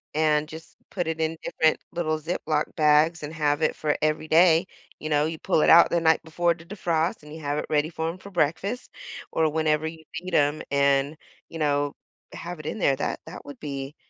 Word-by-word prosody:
and 155 -1 +2
just 160 +1 -11
put 175 -4 -3
it 160 0 -2
in 160 0 -1
different 160 -1 +1
little 155 -2 -1
Ziploc 155 -1 -2
bags 155 +2 +3
and 150 - -5
have 150 -1 0
it - - +1
for 150 -1 0
every 155 0 0
day. 165 +1 +5 0.3
You 155 - -5
know, 150 0 +2
you 160 +1 -3
pull - - +1
it - - +3
out 170 - +8
the 170 - +1
night 160 -1 +3
before 170 +2 +1
to 165 0 -15
defrost, 170 -2 -1
and 150 0 -11
you 160 - -8
have 145 0 -2
it - - -4
ready 150 0 +1
for 160 -1 -3
him 170 - -6
for 200 - -12
breakfast 185 - -1 0.4
or 160 -1 +2
whenever 155 0 0
you 160 0 -9
feed 180 +2 -6
him 145 0 +2
and, 140 +1 +2 0.3
you 165 - -8
know, 145 -1 0 0.4
have 175 -1 -7
it 155 - -10
in 215 - -4
there. 140 -7 +3
That 140 - -3
that - - -10
would 145 - -10
be 140 -1 -6
155 Hz, 215 wpm, -25 LUFS, 150-165 Hz, 0.4 s, out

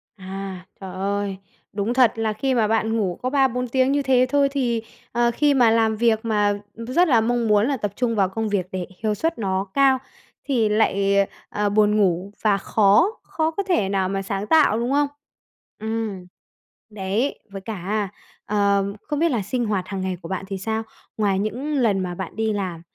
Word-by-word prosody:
À, 190 -1 -7 0.2
trời 190 -1 -7
ơi! 200 0 -2 0.4
Đúng 205 +4 -1
thật 250 -3 +5
là 220 -1 -1
khi 260 +5 -1
mà 225 -3 +2
bạn 225 0 +1
ngủ 185 -5 -1
có 255 - -1
3-4 255 -3 +1
tiếng 260 +2 +2
như 285 0 +2
thế 255 -2 +3
thôi 280 0 +3
thì, 240 -5 0 0.3
ờ, 235 0 +2
khi 290 +1 +3
mà 245 -4 +5
làm 225 -1 +3
việc 225 -1 +2
mà 210 -2 +2 0.2
rất 255 +10 +1
là 235 -6 +4
mong 235 0 0
muốn 210 +3 +4
là 275 -2 0
tập 205 -3 -3
trung 240 -3 0
vào 195 -2 +2
công 220 +2 -2
việc 190 -3 -1
để 185 -2 -3 0.2
hiệu 215 - +2
suất 325 +1 -1
nó 195 -1 -1
cao, 275 -1 +4 0.5
thì 235 -6 +1
lại, 200 -2 +2 0.3
à, 205 0 0
buồn 210 +1 +3
ngủ 190 0 +1
và 210 -2 +3
khó 210 - +3
khó 320 0 -1
có 400 +5 -2
thể 350 - +1
nào 190 -1 0
mà 195 0 -1
sáng 195 +1 -3
tạo, 295 -9 +4
đúng 240 +3 -1
không? 290 +1 +3 0.7
Ừm. 220 -4 -3 0.6
Đấy, 210 +6 -2
với 195 -1 -7
cả, 205 0 -3 0.4
ờm, 200 -1 +1
không 295 -1 -3
biết 335 -1 +3
là 230 -5 0
sinh 240 +5 -2
hoạt 200 -4 -1
hàng 195 -2 -4
ngày 185 -1 -2
của 165 - -9
bạn 190 0 -3
thì 195 - -4
sao? 220 +3 -2 0.3
Ngoài 200 -3 +1
những 245 +9 -2
lần 225 -8 +2
mà 180 -1 -3
bạn 190 0 -6
đi 220 -1 0
làm 185 -5 -3
215 Hz, 200 wpm, -23 LUFS, 195-245 Hz, 0.7 s, thật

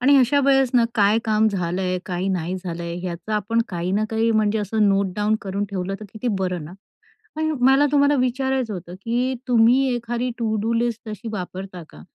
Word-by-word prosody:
आणि 280 +3 +5
अशावेळेस 270 0 +3
ना 240 - +5
काय 210 0 +4
काम 220 0 +3
झालं 180 -2 -2
आहे? 185 0 -1
काय 180 +1 -2
नाही 180 -1 -2
झालं 170 -1 -4
आहे? 170 +1 -4
याचा 175 +5 -4
आपण 210 +3 0
काही 180 -1 -3
ना 210 +2 +1
काही 225 +1 +1
म्हणजे 215 -1 +2
असं 210 0 +1
नोटडाउन 200 +2 +1
करून 200 +1 -3
ठेवलं 195 0 -3
तर - - -7
किती 225 +3 -3
बरं 180 -4 -2
ना. 165 - -10 0.6
आणि 315 0 0
मला 270 +2 +5
तुम्हाला 285 0 +4
विचारायचं 255 -2 0
होतं, 175 -1 -8
की 240 +6 -1
तुम्ही 245 +2 +5
एखादी 240 +1 -2
टू-डू 220 -1 -1
लिस्ट 230 -1 -1
तशी 215 +2 -7
वापरता 185 -2 -6
का? 75 - -14
215 Hz, 190 wpm, -22 LUFS, 185-240 Hz, 0.6 s, आणि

